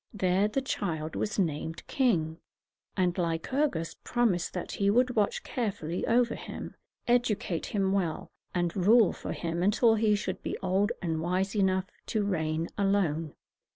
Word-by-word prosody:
There 190 +1 +2
the 265 +6 -1
child 160 -10 -3
was 210 - -2
named 165 -3 -2
king; 170 - +1 0.6
and 180 -2 +2
Lycurgus 165 - -1
promised 230 -8 +1
that 180 - -4
he 200 0 +1
would 250 +4 +3
watch 210 -2 +1
carefully 190 - -3
over 235 0 +3
him, - - -7 0.3
educate 230 -7 +1
him 195 -2 0
well, 175 -5 -1 0.2
and 175 -1 -1
rule 210 +3 +5
for - - -6
him 170 0 -3
until 215 +4 +4
he 215 -1 +3
should 205 - -3
be - - -3
old 190 +3 +1
and 160 -2 -1
wise 185 +4 0
enough 190 -2 +2 0.2
to 215 -2 0
reign 160 -4 -1
alone. 175 -6 +1
190 Hz, 150 wpm, -29 LUFS, 170-215 Hz, 0.6 s, rule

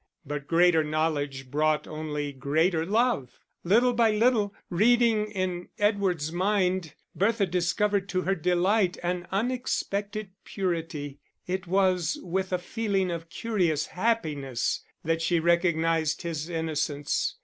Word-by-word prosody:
But 145 0 -5
greater 170 -1 +4
knowledge 145 -4 -2
brought 155 +1 +1
only 150 -2 -4
greater 160 +5 +1
love. 220 - 0 0.2
Little 235 +7 +4
by 230 -1 +4
little, 215 -1 +2 0.2
reading 220 +2 +3
in 185 -3 -3
Edward's 195 -7 +1
mind, 185 -2 0 0.2
Bertha 210 +1 +2
discovered 195 +3 0
to 185 - 0
her 195 - +1
delight 180 +2 +2
an 175 0 -2
unexpected 210 -2 -2
purity; 165 -7 -3 0.3
it 185 0 -3
was 185 -2 +2
with 190 +2 -2
a 180 - +2
feeling 195 -1 -1
of 165 -1 -5
curious 175 -7 0
happiness 155 - -1 0.2
that 165 +1 0
she 165 +1 +2
recognised 165 -2 +1
his 165 -1 -4
innocence. 155 -3 -1
175 Hz, 120 wpm, -27 LUFS, 160-200 Hz, 0.3 s, greater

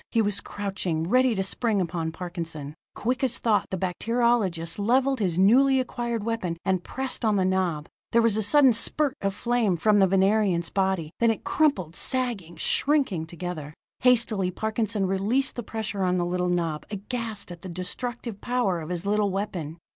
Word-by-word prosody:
He 230 - +1
was 205 -2 +1
crouching, 190 -5 -3
ready 255 +3 +3
to 195 - 0
spring 215 +2 0
upon 170 -2 -2
Parkinson. 165 -4 -6 0.2
Quick 255 +4 -1
as 245 -3 0
thought, 215 -3 +1
the 190 - -2
bacteriologist 190 -3 0
leveled 260 +5 +2
his 180 -5 0
newly 260 +8 +5
acquired 235 -3 -2
weapon, 215 -7 -2
and 185 -2 +1
pressed 265 -1 -4
on 215 -2 +3
the 190 -2 +2
knob. 180 -5 0 0.2
There 235 - +4
was 230 -3 +3
a 220 - +1
sudden 265 +4 +6
spurt 280 +5 +1
of 195 0 -1
flame 235 -7 +1
from 210 +4 +3
the 195 - +5
Venerian's 195 -2 +2
body; 190 -5 0
then 235 - +4
it 225 - -1
crumpled, 190 - +1
sagging, 235 -10 -2
shrinking 220 - +1
together. 165 -3 -6 0.2
Hastily 230 -6 +3
Parkinson 215 +1 -1
released 205 +8 +1
the 240 - -3
pressure 215 -2 -4
on 180 -1 +2
the 175 - 0
little 180 0 -1
knob, 165 -4 -1
aghast 215 -1 -5
at 175 -1 -9
the 185 - -8
destructive 210 +5 -5
power 240 -9 0
of 155 - -7
his 180 +1 -3
little 205 0 +2
weapon. 185 -5 -4
200 Hz, 175 wpm, -26 LUFS, 180-235 Hz, 0.2 s, sudden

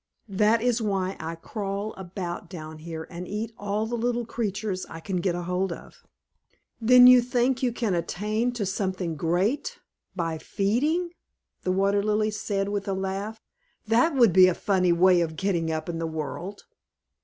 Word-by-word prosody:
That 215 +3 +2
is 245 -1 +1
why 195 -3 -1
I 160 +1 -4
crawl 200 +4 -4
about 180 -2 -6
down 155 -2 -8
here 160 0 -6
and 175 +1 -7
eat 220 +3 -4
all 205 +1 -2
the 230 - -6
little 240 0 -1
creatures 205 -4 -3
I 165 - -8
can 185 +2 -3
get 175 0 0
hold 180 +1 -1
of." - - -10 0.8
"Then 250 +2 +8
you 250 0 +9
think 245 +1 0
you 250 -2 +1
can 230 -4 -1
attain 210 +7 -1
to 230 -4 -2
something 185 -3 -2
great 180 - 0 0.4
_by 165 -2 -2
feeding! 250 - +1
_" 350 - -6 0.5
the 185 - -1
Water 200 +2 +2
Lily 215 +1 +1
said, 205 -2 -2
with 205 0 -3
a 195 - 0
laugh. 195 +3 -3 0.5
"That 240 +8 +3
would 235 -8 +5
be 185 0 +8
a 180 - +1
funny 185 -3 +2
way 180 +1 +5
of 160 -1 -2
getting 170 -2 0
up 155 0 -3
in 170 -1 -3
the 165 - -2
world." 160 +5 -5
195 Hz, 175 wpm, -26 LUFS, 175-220 Hz, 0.8 s, you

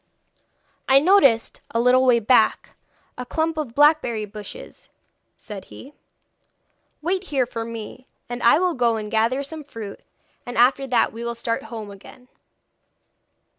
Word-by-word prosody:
'I 270 +1 +6
noticed, 280 - +3
a 230 - -1
little 250 +2 +4
way 250 -2 +5
back, 230 0 +2 0.5
a - - -3
clump 320 +5 -2
of 290 -7 -5
blackberry 290 -7 +3
bushes,' 210 - -11 0.5
said 205 -3 -10
he. 275 +3 -13 1.1
'Wait 370 +3 -1
here 270 -7 0
for 230 -1 -5
me, 230 +2 -9 0.2
and 240 0 -6
I 235 - +5
will 360 +1 +1
go 240 -4 +1
and 215 -1 -5
gather 230 +5 +1
some 310 +2 -8
fruit, 220 -7 -9 0.4
and 245 -1 -7
after 265 +3 +3
that 250 -4 +1
we 230 +1 -7
will 235 0 -3
start 230 0 -3
home 220 -3 -8
again.' 225 +5 -15
245 Hz, 145 wpm, -22 LUFS, 225-280 Hz, 1.1 s, I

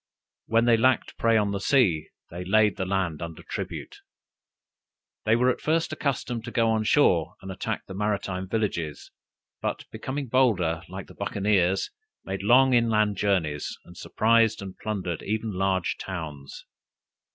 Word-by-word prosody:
When 115 +1 +3
they 120 -1 +5
lacked 130 +2 +2
prey 115 -1 +4
on 105 -2 +1
the 100 - -2
sea, 95 - +2 0.2
they 90 +2 -5
laid 105 +1 +3
the 95 - -3
land 95 -5 -1
under 85 -1 -7
tribute. - - -6 1.3
They 110 - +4
were 125 +2 +3
at - - -5
first 160 0 0
accustomed 130 -6 -2
to - - -6
go 115 -1 +2
on 110 -1 0
shore 85 - +3
and 95 - -8
attack 105 +3 -4
the 95 - -9
maritime 95 -2 -2
villages, 95 -9 -2 0.5
but - - -3
becoming 140 +2 -4
bolder, 105 -11 +2
like 95 0 -7
the - - -14
Buccaneers, 95 -2 +1 0.3
made 95 0 -4
long 130 +5 +5
inland 110 -4 +3
journeys, 85 -8 0
and 90 - -14
surprised 115 +4 +2
and 95 -2 -7
plundered 95 -6 -3
even 110 +1 -2
large 95 -1 0
towns. 75 -7 -7
100 Hz, 150 wpm, -26 LUFS, 90-115 Hz, 1.3 s, they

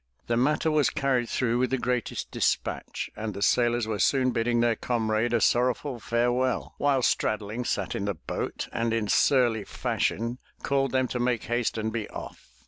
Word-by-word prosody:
The 120 - 0
matter 150 +6 +2
was 150 -2 +3
carried 130 -4 0
through 120 -1 0
with 130 0 +1
the 130 - +1
greatest 125 -1 -2
dispatch - - -1
and 105 -2 -4
the 100 - -2
sailors 120 0 +2
were 110 -2 -3
soon 130 +5 +3
bidding 120 0 +1
their 120 -1 +3
comrade 110 -1 0
a 120 - +3
sorrowful 125 +3 +1
farewell, 120 +3 0
while 140 -3 +2
Straddling 110 +2 0
sat 100 -5 -1
in 100 - -2
the 100 -2 -1
boat 80 - -4
and 115 0 0
in 115 -2 0
surly 120 -3 +3
fashion 115 +5 -2 0.2
called 135 -1 +1
them 130 0 +1
to 125 - -3
make 120 -2 0
haste 120 -1 -1
and 110 0 -2
be 110 -3 -3
off. - - -9
120 Hz, 180 wpm, -27 LUFS, 110-125 Hz, 0.2 s, was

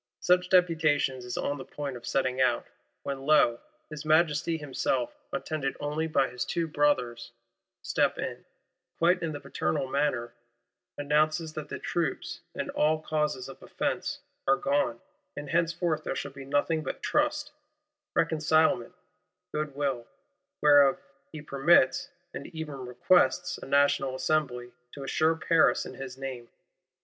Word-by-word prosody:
Such 180 0 +3
Deputation 160 -7 +3
is 125 -1 -6
on 145 0 -2
the - - -6
point 140 -2 -6
of 120 - -9
setting 130 -1 0
out—when 135 +1 -2
lo, 135 -5 +4 0.3
his 155 -1 -6
Majesty 155 +1 +2
himself 135 -4 -2 0.2
attended 140 0 -3
only 150 +2 -2
by 140 -4 +2
his 125 0 -4
two 170 -1 -1
Brothers, 130 -6 0 0.5
step - - +1
in; - - -5 0.5
quite 175 +2 +3
in 165 -2 -2
the 145 - -5
paternal 135 -7 -2
manner; 130 -4 -1 0.6
announces 155 +2 +1
that 155 -1 -6
the - - -4
troops, 165 -6 -3
and - - -3
all 155 +1 +2
causes 150 -4 -1
of 135 - -11
offence, - - -3 0.3
are 135 - +6
gone, 140 -4 0 0.4
and 145 -1 -6
henceforth 165 -1 0
there - - -3
shall 140 - -4
be 135 0 -10
nothing 145 +3 +1
but - - -6
trust, 300 0 0 0.6
reconcilement, 155 -2 +2 0.6
good 150 -2 -3
will; 135 -5 -2 0.6
whereof 145 -2 +6 0.3
he 155 -2 -8
"permits 140 -1 +3 0.2
and - - -6
even 150 -5 -7
requests," 175 +6 +2
a - - -9
National 140 -1 +2
Assembly 130 -3 -1 0.2
to 140 - -7
assure 155 +4 +2
Paris 160 0 +3
in - - -8
his 130 -1 -8
name! 130 -3 -6
145 Hz, 140 wpm, -28 LUFS, 135-160 Hz, 0.6 s, are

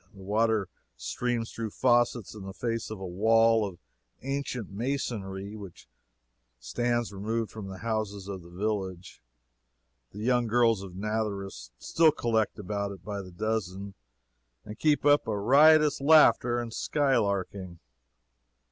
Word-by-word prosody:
The 95 - -12
water 110 0 +1 0.3
streams 120 - -2
through 115 -1 -4
faucets 120 -2 +1
in 105 - -10
the 95 0 -8
face 115 0 -3
of 110 -2 -6
a 95 - -6
wall 115 +4 +3
of 90 -3 -10 0.5
ancient 135 -6 -4
masonry 105 -4 -4
which 100 -5 -11 0.7
stands 120 - -1
removed 110 +3 -3
from 110 -3 -8
the 95 -1 -8
houses 105 -3 -3
of 95 -2 -6
the 85 - -14
village. 95 -3 -4 0.9
The - - -14
young 120 0 +2
girls 115 -2 +3
of 95 -2 -9
Nazareth 100 - -3
still 160 - +3
collect 110 -7 0
about 100 0 -3
it 95 -3 -11
by 100 -1 -4
the 95 - -11
dozen 100 0 -3 0.7
and 105 - -9
keep 150 -2 +2
up 145 -3 +4
a 105 -2 -1
riotous 150 +7 +5
laughter 125 -5 +5
and 115 -2 -5
sky 140 0 +1
larking. 100 -4 -2
110 Hz, 140 wpm, -28 LUFS, 95-120 Hz, 0.9 s, riotous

